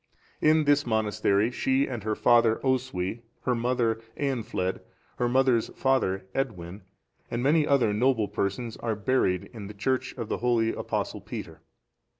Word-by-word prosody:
In 155 0 +4
this 145 -1 +3
monastery, 110 -1 +1
she 130 +2 +1
and 120 -5 -5
her 110 0 -1
father, 115 -1 +4
Oswy, 120 -6 -1 0.2
her 125 - 0
mother, 115 -2 0 0.2
Eanfled, 115 -9 -1 0.4
her 120 -1 +1
mother's 130 -2 +3
father, 115 -9 +1
Edwin,(442) 100 -7 -3 0.5
and 120 +1 -2
many 150 +2 +3
other 130 -7 +3
noble 115 -1 +2
persons, 110 +5 -3
are 115 -2 -2
buried 105 -4 0
in 105 -4 -7
the 105 - -10
church 130 +5 -1
of 115 -3 -4
the - - -2
holy 115 -2 +2
Apostle - - -3
Peter. - - -8
120 Hz, 150 wpm, -27 LUFS, 105-130 Hz, 0.5 s, In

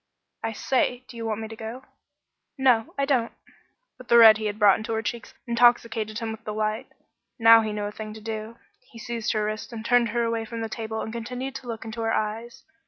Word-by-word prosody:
"I 225 0 -3
say 250 +1 0
do - - -12
you 230 -1 -4
want 220 0 -2
me 220 - -5
to 225 - -9
go?" 225 +4 -8 0.7
"No, 250 -4 +2
I 280 - +1
don't." 255 -5 +1 0.7
But 255 - -12
the 235 - +6
red 220 -2 +9
he 215 - -2
had 205 0 -4
brought 205 -3 +5
into 220 +1 -4
her 220 0 -1
cheeks 235 +1 -5
intoxicated 235 -2 +2
him 225 -1 -3
with 220 - -9
delight. 215 0 -2 0.5
Now 230 -1 +8
he 215 -1 -3
knew 210 0 -3
a 205 - -4
thing 215 0 -7
to 220 - -10
do. 220 +1 -6 0.3
He 230 - -13
seized 230 -1 -3
her 215 -1 0
wrists 215 +3 -4
and 225 -1 -7
turned 245 -1 +3
her 235 +2 0
away 230 -1 -1
from 230 0 -6
the 225 - -3
table 220 0 -4
and 220 - -5
continued 250 +3 -5
to 260 - -13
look 225 -1 -6
into 225 +1 -6
her 225 0 0
eyes. 225 +3 -4
225 Hz, 230 wpm, -25 LUFS, 220-235 Hz, 0.7 s, red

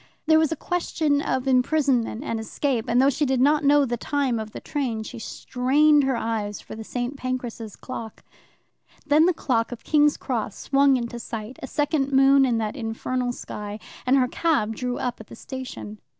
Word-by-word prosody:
There 315 0 +5
was 315 -1 +2
a - - 0
question 315 -3 0
of 260 -2 -1
imprisonment 260 -2 +2
and 230 -6 -3
escape, 235 +1 -1
and 240 +1 +2
though 270 +2 +5
she 295 - -1
did 265 -2 +1
not 295 +3 +3
know 285 0 +5
the 240 -1 -2
time 265 -2 -1
of 220 0 -5
the - - -7
train, 245 -7 -3
she 220 - -8
strained 280 +6 +2
her 265 -2 +1
eyes 215 -3 -2
for - - -11
the 220 - -7
St. 245 +4 -4
Pancras' 245 -5 -5
clock. 230 -4 -8 0.8
Then 305 +3 +5
the - - +5
clock 230 -6 0
of 245 - -8
King's 295 -1 +3
Cross 225 -5 -3
swung 275 -1 +3
into 235 0 -5
sight, 225 +1 -7
a 265 - -5
second 290 -1 0
moon 270 0 +6
in 240 -3 +1
that 220 +1 -2
infernal 245 +1 -2
sky, 210 -3 -7 0.3
and 265 +2 +5
her 255 -2 +3
cab 245 -7 0
drew 250 +2 -3
up 245 -2 -3
at 215 - -13
the - - -11
station. 250 -4 -8
255 Hz, 195 wpm, -24 LUFS, 230-285 Hz, 0.8 s, moon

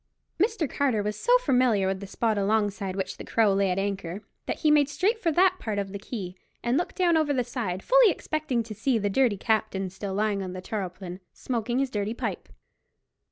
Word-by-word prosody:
Mr. 425 -6 +1
Carter 250 -6 0
was 210 0 -2
so 485 +2 +4
familiar 250 - +2
with 190 0 -1
the 200 - -7
spot 220 +2 0
alongside 200 -2 0
which 190 -1 -3
the - - -7
Crow 220 -3 +2
lay 195 0 +2
at 180 - 0
anchor, 195 -1 -3 0.2
that - - -3
he 310 - +4
made 295 -2 +4
straight 405 +9 +1
for 335 -6 +1
that 370 +3 +4
part 215 -2 -3
of 200 -1 -2
the 200 - -5
quay 195 -4 -6 0.3
and 240 +1 +1
looked 345 +5 -1
down 350 -3 +3
over 310 -2 +2
the 255 -2 +1
side, 225 -7 -4
fully - - +6
expecting 310 -8 -1
to 220 -1 -8
see 230 +4 +1
the 205 -2 -1
dirty 240 -2 +3
captain 200 -3 0
still 190 0 -5
lying 205 -1 0
on 185 -1 -5
the 185 - -6
tarpaulin, 185 -2 -5
smoking 240 -1 -2
his 270 -1 0
dirty 210 +2 -2
pipe. - - -4
220 Hz, 210 wpm, -27 LUFS, 195-275 Hz, 0.3 s, fully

